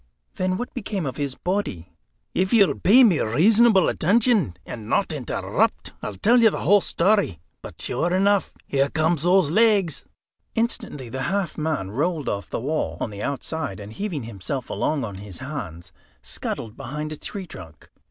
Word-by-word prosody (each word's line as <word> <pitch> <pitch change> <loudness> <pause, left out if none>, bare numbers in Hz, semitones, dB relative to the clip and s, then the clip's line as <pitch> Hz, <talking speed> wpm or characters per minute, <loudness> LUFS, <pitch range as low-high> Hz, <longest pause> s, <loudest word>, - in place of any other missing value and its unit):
"Then, 185 0 -1
what 245 +3 -5
became 200 -7 -3
of 135 - -4
his 140 -3 -2
body?" 175 - -3 0.4
"If 190 +1 +1
you'll 210 -5 +4
pay 240 +8 +7
me 195 -10 +5
reasonable 200 - +4
attention, 205 - +2
and 110 -3 -8
not - - +1
interrupt, - - -1
I'll 105 - -5
tell 235 - +4
you 225 - +7
the - - -4
whole 205 0 +5
story. 185 - +1 0.2
But - - -10
sure 165 +8 -1
enough! 195 0 +2
Here 140 0 +1
come 160 +3 +2
those 175 0 +3
legs!" 205 -5 +3 0.5
Instantly 225 - -2
the 130 +3 -4
half 195 -3 -1
man 150 -12 -2
rolled 155 - -1
off 100 0 -4
the - - -3
wall, 150 +6 -2
on 110 - -3
the 100 0 -7
outside, 140 - -3
and 105 +1 -9
heaving 180 - -4
himself 115 +5 -5
along 150 -3 0
on 100 -4 -5
his 100 -2 -9
hands, 130 - -7 0.3
scuttled 110 0 -5
behind 150 +2 -5
a - - -4
tree 195 +3 -6
trunk. 85 - -12
155 Hz, 170 wpm, -23 LUFS, 120-200 Hz, 0.5 s, pay